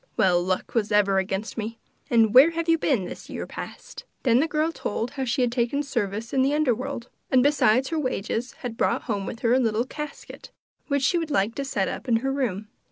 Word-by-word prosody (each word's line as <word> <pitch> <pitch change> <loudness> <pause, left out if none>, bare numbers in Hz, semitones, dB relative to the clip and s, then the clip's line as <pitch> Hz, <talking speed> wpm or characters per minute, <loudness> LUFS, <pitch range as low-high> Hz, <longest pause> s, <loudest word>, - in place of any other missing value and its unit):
Well, 180 -2 +4
luck 185 +1 -2
was 220 -2 0
ever 200 -2 +4
against 195 +4 -3
me! 225 +1 -4 0.3
And 225 -2 +4
where 265 +6 +9
have 335 0 -3
you 330 -1 +3
been 245 -13 +1
this - - -9
year - - -5
past?' - - -9 0.2
Then 240 -2 +4
the 310 - +2
girl 310 +1 0
told 230 -5 -3
how 270 -2 -3
she 250 +1 +1
had 245 - +1
taken 245 +4 0
service 225 -5 -3
in 265 - +3
the 275 +3 +2
under 300 -5 +3
world, 255 0 -5 0.2
and, 255 -2 +4
beside 265 -3 +3
her 325 -1 -1
wages, 250 -2 -2
had 230 -2 -4
brought 240 - +1
home 200 -4 -3
with 225 - -6
her 235 0 +3
a 255 - +4
little 225 -1 +1
casket, 300 +2 -8 0.4
which 280 -2 0
she 345 +6 +3
would 325 -2 -4
like 205 -4 +1
to 280 - -3
set 205 -8 -1
up - - -5
in 235 - +3
her 270 - +1
room. 215 -7 -2
245 Hz, 230 wpm, -25 LUFS, 215-280 Hz, 0.4 s, where